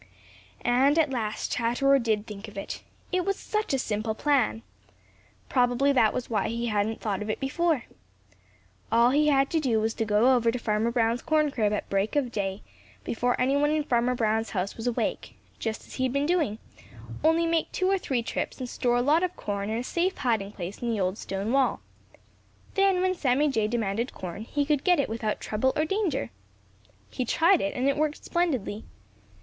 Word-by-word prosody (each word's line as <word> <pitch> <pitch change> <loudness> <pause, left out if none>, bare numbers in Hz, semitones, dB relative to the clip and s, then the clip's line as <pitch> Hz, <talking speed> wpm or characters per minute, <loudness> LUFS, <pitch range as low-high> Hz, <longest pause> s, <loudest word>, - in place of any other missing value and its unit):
And 265 +5 +4
at 310 -4 +3
last 220 -4 -3
Chatterer 260 +4 +2
did 220 -3 0
think 210 0 -8
of 210 - -12
it. 195 - -5 0.3
It 365 -1 +1
was 395 +1 -1
such 430 0 -2
a 270 - +2
simple 215 -2 -2
plan! 220 - +1 0.8
Probably 250 +2 +2
that 230 -6 +4
was 250 - -4
why 210 -4 0
he 235 +1 -2
hadn't 215 0 0
thought 205 -2 -2
of 210 - -4
it 215 - -2
before. 300 0 0 1.1
All 235 +2 +5
he 300 +2 +3
had 275 -2 +3
to 325 - +2
do 245 -7 +1
was 220 +1 0
to - - -1
go 220 +4 +4
over 235 -2 +2
to 250 - -3
Farmer 220 -1 0
Brown's 235 0 +1
corn 305 -2 +2
crib 215 -5 +1
at 210 - -2
break 195 +6 -1
of 270 -5 +1
day, 195 -2 -3 0.4
before 245 +2 -1
any 265 +2 +2
one 295 +1 +3
in 305 0 +1
Farmer 250 -2 +1
Brown's 225 -1 0
house 190 0 -2
was 225 +2 -5
awake, 240 - -2 0.2
just 220 -1 -4
as - - -13
he 260 - -2
had 255 - -1
been 280 +1 +1
doing, 310 - +1 0.7
only 325 +2 +4
make 330 -1 0
two 370 - 0
or 390 0 +2
three 255 -8 -1
trips - - -3
and 255 - -5
store 240 0 0
a 245 - +2
lot 305 +5 +4
of 365 -1 -1
corn 200 0 -3
in 220 - -1
a 240 - -2
safe 350 +8 -1
hiding 220 -6 0
place 185 0 -7
in 240 - -1
the 225 -2 -1
old 185 0 0
stone 195 +3 -3
wall. 270 0 +2 0.9
Then, 390 -2 +3
when 370 0 +2
Sammy 290 -3 +2
Jay 220 -6 +1
demanded 230 +1 -2
corn, 185 +4 -6
he 285 +4 -1
could 295 -2 +1
get 355 -3 +4
it 280 - 0
without 220 -1 -2
trouble 240 +5 0
or 310 - +1
danger. 360 - -1 0.8
He 255 - -2
tried 335 +9 +3
it, 195 - -2
and 255 +2 0
it 280 - +2
worked 305 0 -1
splendidly. 260 - -1
245 Hz, 205 wpm, -27 LUFS, 220-295 Hz, 1.1 s, All